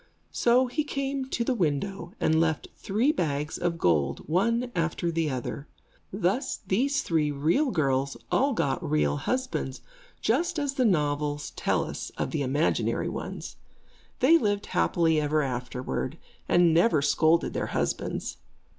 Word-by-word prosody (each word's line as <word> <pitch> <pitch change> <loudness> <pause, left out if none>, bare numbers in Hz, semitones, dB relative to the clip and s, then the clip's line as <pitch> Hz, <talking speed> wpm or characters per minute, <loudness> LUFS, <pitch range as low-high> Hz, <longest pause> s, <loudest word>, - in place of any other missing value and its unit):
So 245 +2 +3
he 255 +5 -1
came 275 -2 -2
to 235 - -1
the 255 - +1
window, 175 - -2
and 160 0 +3
left 160 -2 0
three 225 +9 +1
bags 150 - -2
of 175 -1 -1
gold, 75 - +1
one 230 - +1
after 170 0 0
the 165 -2 0
other. 130 +2 -4 0.4
Thus 205 +8 0
these 275 +8 +1
three 155 -3 +1
real 160 - +1
girls 135 - 0
all 275 +1 +3
got 135 - 0
real 75 -1 +1
husbands, 170 - -2 0.4
just 335 +9 +1
as 285 -2 -1
the 260 -2 +1
novels 145 -5 0
tell - - 0
us - - -6
of - - -2
the 155 - -1
imaginary 140 +4 0
ones. - - -6 0.6
They 325 +6 +6
lived 205 -4 0
happily 165 -3 +2
ever 150 +1 +1
afterward, 125 +2 -3 0.3
and 175 -2 +5
never 165 -3 +4
scolded 160 +3 +3
their - - -2
husbands. - - -2
170 Hz, 145 wpm, -27 LUFS, 145-240 Hz, 0.6 s, They